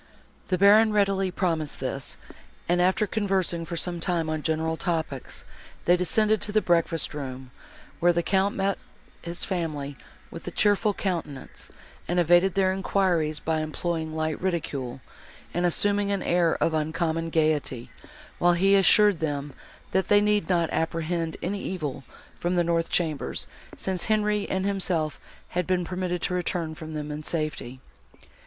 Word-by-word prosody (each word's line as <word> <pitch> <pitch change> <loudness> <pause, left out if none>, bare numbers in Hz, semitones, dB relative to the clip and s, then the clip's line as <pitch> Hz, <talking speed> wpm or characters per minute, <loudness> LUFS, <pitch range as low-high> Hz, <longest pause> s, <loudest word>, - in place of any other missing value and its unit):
The 185 - +1
Baron 210 +3 +6
readily 195 -2 +2
promised 165 -5 -1
this, 135 0 -4 0.5
and, 175 +1 +2
after 190 +4 +3
conversing 190 -6 -1
for 170 0 -5
some 175 +1 -2
time 165 -2 0
on 155 -1 -2
general 160 +1 0
topics, 160 -6 -3 0.4
they 175 - +6
descended 215 +4 +2
to 210 - -3
the 215 - +4
breakfast 170 -4 +1
room, 130 -3 -6 0.5
where 175 +1 +5
the 170 0 0
Count 195 +2 +1
met 195 0 0 0.4
his 170 0 -5
family 155 -6 -3 0.4
with - - -9
a - - 0
cheerful 205 0 +2
countenance, 165 -8 -4 0.4
and 175 +1 +1
evaded 175 +2 +4
their 190 -1 +3
enquiries 180 -5 +1
by 160 -1 -1
employing 160 0 -3
light 155 -1 -2
ridicule, 140 -8 -3 0.5
and 175 +1 +2
assuming 205 +3 +2
an 200 -2 0
air 170 -2 +2
of 165 - +1
uncommon 160 +1 -1
gaiety, 150 -6 0 0.5
while 175 0 +4
he 195 +3 +3
assured 200 -1 +6
them, 145 -2 -3 0.4
that 190 0 +1
they 205 - +6
need 210 -1 +1
not 170 -3 +2
apprehend 165 0 -1
any 195 +3 -2
evil 150 -8 -4 0.4
from 175 +1 0
the 175 - +3
north 165 0 0
chambers, 155 -5 -1 0.3
since 185 -2 -2
Henri 210 -1 +1
and 190 0 -1
himself 180 -6 -1 0.3
had 180 -1 -2
been 180 -1 +1
permitted 180 -1 -3
to 180 - -1
return 175 -2 -2
from 155 0 -8
them 150 0 -4
in 150 +1 -5
safety. 155 -5 -3
175 Hz, 155 wpm, -26 LUFS, 155-190 Hz, 0.5 s, Baron